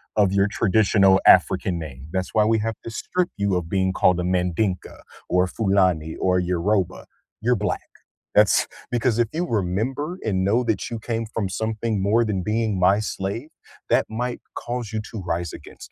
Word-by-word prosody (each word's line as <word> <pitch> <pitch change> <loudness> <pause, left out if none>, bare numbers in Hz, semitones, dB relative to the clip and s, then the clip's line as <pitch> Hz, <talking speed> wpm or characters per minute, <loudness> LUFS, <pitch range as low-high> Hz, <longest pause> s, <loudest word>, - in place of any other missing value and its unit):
of 100 -3 +3
your 100 0 +3
traditional 100 -2 +3
African 85 -2 +4
name. 70 -2 -8
That's 95 -1 -2
why 105 -1 +4
we 110 0 +2
have 115 +1 -2
to 115 - -6
strip 180 +10 -2
you 100 -2 +1
of 85 -2 -2
being 95 0 +1
called 90 -1 +3
a 90 - -1
Mandinka 90 +1 -1 0.3
or 90 +1 +3
Fulani 90 -6 +1
or 90 0 +2
Yoruba. 90 +2 -1 0.3
You're 125 +2 +2
Black. 105 -2 -3 0.5
That's 105 -1 +4 0.2
because 120 -1 +1
if 115 -2 +2
you 175 +3 -1
remember 120 - -2
and 95 -4 0
know 110 +6 +2
that 105 -6 -1
you 115 - -4
came 115 0 -3
from 110 -2 -3
something 110 0 -2
more 110 +4 +3
than 95 -4 -2
being 110 0 0
my 95 +3 +4
slave, 110 +5 -4 0.4
that - - +3
might 120 +2 -3
cause 120 -2 -4
you 110 - -1
to 110 - -5
rise 85 0 -2
against - - -12
100 Hz, 175 wpm, -23 LUFS, 90-115 Hz, 0.5 s, African